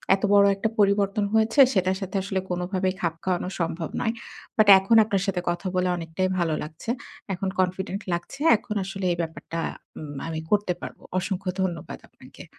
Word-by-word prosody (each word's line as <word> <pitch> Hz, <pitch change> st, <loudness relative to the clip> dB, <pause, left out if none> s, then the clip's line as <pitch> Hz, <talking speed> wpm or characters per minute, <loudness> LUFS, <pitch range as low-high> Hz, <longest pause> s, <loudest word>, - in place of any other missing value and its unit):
এত 195 Hz, -, -10 dB
বড় 200 Hz, 0 st, +7 dB
একটা 215 Hz, +3 st, -1 dB
পরিবর্তন 200 Hz, 0 st, +3 dB
হয়েছে 220 Hz, +5 st, +2 dB
সেটার 190 Hz, -1 st, +1 dB
সাথে 195 Hz, 0 st, -5 dB
আসলে 195 Hz, -1 st, -1 dB
কোনোভাবেই 185 Hz, +1 st, -1 dB
খাপ 170 Hz, -2 st, 0 dB
খাওয়ানো 180 Hz, 0 st, -1 dB
সম্ভব 165 Hz, -1 st, -2 dB
নয়। 225 Hz, -1 st, 0 dB, 0.4 s
বাট 215 Hz, -, +5 dB
এখন 195 Hz, +4 st, +2 dB
আপনার 200 Hz, -3 st, 0 dB
সাথে 190 Hz, -3 st, -1 dB
কথা 175 Hz, +2 st, -2 dB
বলে 180 Hz, 0 st, +2 dB
অনেকটাই 165 Hz, +3 st, -2 dB
ভালো 165 Hz, -2 st, +1 dB
লাগছে। 155 Hz, +8 st, -9 dB, 0.4 s
এখন 190 Hz, +1 st, -3 dB
কনফিডেন্ট 185 Hz, +2 st, -1 dB
লাগছে। 175 Hz, +10 st, -5 dB, 0.2 s
এখন 210 Hz, -, -6 dB
আসলে 195 Hz, 0 st, -5 dB
এই 175 Hz, -, -1 dB
ব্যাপারটা 165 Hz, 0 st, -5 dB, 0.4 s
উম 145 Hz, -2 st, -7 dB
আমি 160 Hz, -1 st, -3 dB
করতে 205 Hz, -3 st, +2 dB
পারবো। -, -, -8 dB, 0.2 s
অসংখ্য 190 Hz, 0 st, -3 dB
ধন্যবাদ 170 Hz, -4 st, -3 dB
আপনাকে। -, -, -14 dB
185 Hz, 170 wpm, -25 LUFS, 175-200 Hz, 0.4 s, বড়